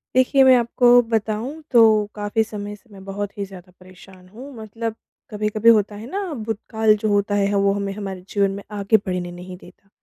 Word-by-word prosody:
देखिए, 260 +1 +4
मैं 260 -1 +7
आपको 245 +1 +4
बताऊँ 225 +7 -2
तो 240 -3 +6 0.3
काफ़ी 210 +2 -1
समय 205 -1 -7
से 225 +3 -25
मैं 195 -1 -13
बहुत 200 +1 -5
ही 200 - -3
ज़्यादा 185 -2 -14
परेशान 185 0 -17
हूँ, 255 +8 -11
मतलब 225 0 -6 0.3
कभी-कभी 215 +1 +1
होता 210 -2 +3
है 210 +2 -9
ना 400 +1 -2
भूतकाल 220 -2 0
जो 215 +1 -2
होता 205 0 +1
है 200 -1 +2
ह - - 0
वो 200 0 +2
हमें 200 0 -3
हमारे 195 -2 -6
जीवन 200 -1 +1
में 200 +1 -7
आगे 205 +1 +2
बढ़ने 180 -3 -4
नहीं 180 +1 -10
देता। 180 +2 -19
205 Hz, 195 wpm, -21 LUFS, 195-225 Hz, 0.3 s, मैं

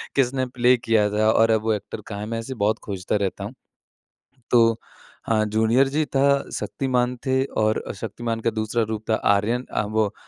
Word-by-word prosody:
किसने 130 -1 +1
प्ले 125 0 +3
किया 110 -3 +2
था? 110 +1 +3
और 115 0 +4
अब 110 -1 +2
वो 110 -1 +1
एक्टर 105 - -5
कहाँ 100 -2 -6
है? 105 - -4
मैं 115 +1 -3
ऐसे 130 +4 -6
बहुत 110 +1 +1
खोजता 95 -1 -3
रहता 100 -2 -2
हूँ। - - -6 1.0
तो 115 -2 +5 0.5
हाँ 110 -1 +2
जूनियर 110 +5 +3
जी 150 +3 0
था, 135 -1 0 0.3
शक्तिमान 125 -2 -1
थे 130 0 +2 0.2
और 110 0 +1
शक्तिमान 115 +2 -4
का 115 - +1
दूसरा 110 +1 -1
रूप 110 -1 -4
था - - +4 0.2
आर्यन 115 +5 0
अ, - - +1
वो 110 -1 0
115 Hz, 185 wpm, -23 LUFS, 110-125 Hz, 1.0 s, तो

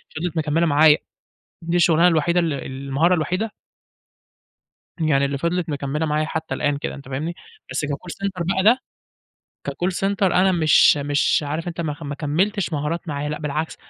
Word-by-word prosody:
فِضلِت 165 +1 -3
مكمّلة 160 +2 +1
معايا، 150 0 +5 0.7
دي 170 +1 -1
الشُغلانة 170 0 +5
الوحيدة 170 +1 +2
ال 165 -2 0
المهارة 140 +6 0
الوحيدة 180 +7 -1 1.5
يعني 145 -4 +2
اللي 140 0 -2
فِضلِت 170 +3 -1
مكمّلة 145 +2 -2
معايا 155 0 0
حتّى 160 0 -4
الآن 145 -1 0
كده، - - -5
أنت 140 -2 -12
فاهمني؟ 150 +6 -3 0.4
بس - - -1
كcall 150 +4 -5
center 190 -3 -2
بقى 190 - 0
ده، 230 +5 +6 0.9
كcall 180 +2 -1
center 195 +2 -2
أنا 190 0 +4
مش 155 -3 +5
مش 145 +1 +1
عارف 160 +4 -3
أنت 170 0 -5
ما 155 -3 -2
خ 145 - -15
ما 145 -1 -4
كمّلتش 175 +6 -1
مهارات 155 +4 -3
معايا 145 0 -3
لأ، 150 - -3
بالعكس، 150 +1 -3
160 Hz, 170 wpm, -22 LUFS, 145-175 Hz, 1.5 s, ده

